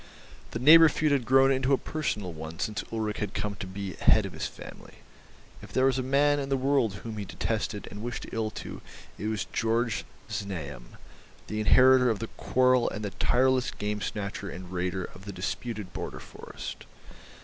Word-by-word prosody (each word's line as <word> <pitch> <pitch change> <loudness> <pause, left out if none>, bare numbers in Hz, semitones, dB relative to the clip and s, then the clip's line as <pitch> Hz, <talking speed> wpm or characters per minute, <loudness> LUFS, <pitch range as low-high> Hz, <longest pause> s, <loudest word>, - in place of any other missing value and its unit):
The - - -4
neighbour 160 +6 +8
feud 150 0 +1
had 135 -4 +2
grown 135 +2 +5
into 130 +1 +2
a - - +5
personal 105 - -3
one 80 +1 -7
since 105 +3 -2
Ulrich 110 -2 -2
had 105 -2 -3
come 105 -1 -2
to 95 - -6
be 95 0 -5
head - - +4
of - - -6
his - - -3
family; - - -12 0.7
if - - -11
there 130 - +3
was 135 -1 +2
a - - +1
man 145 +3 +3
in 135 -1 -3
the 135 - +2
world 130 -5 +2
whom 110 -2 -5
he 105 - -3
detested 110 +1 -3
and 105 - -7
wished 120 0 -4
ill 110 -1 -1
to - - -8 0.4
it 105 - -3
was 110 -2 -1
Georg 115 0 +1 0.3
Znaeym, 75 -11 -6 0.5
the 105 - -4
inheritor 130 +3 +6
of 110 - +1
the 115 +2 -5
quarrel 130 -1 +2
and 105 0 -5
the 100 - -3
tireless 130 +5 +2
game 105 0 -3
snatcher 100 -1 -4
and 90 0 -8
raider 90 +1 -1
of 95 +2 -10
the 100 - -5
disputed 100 +1 -4
border - - -5
forest. - - -9
110 Hz, 190 wpm, -28 LUFS, 100-130 Hz, 0.7 s, neighbour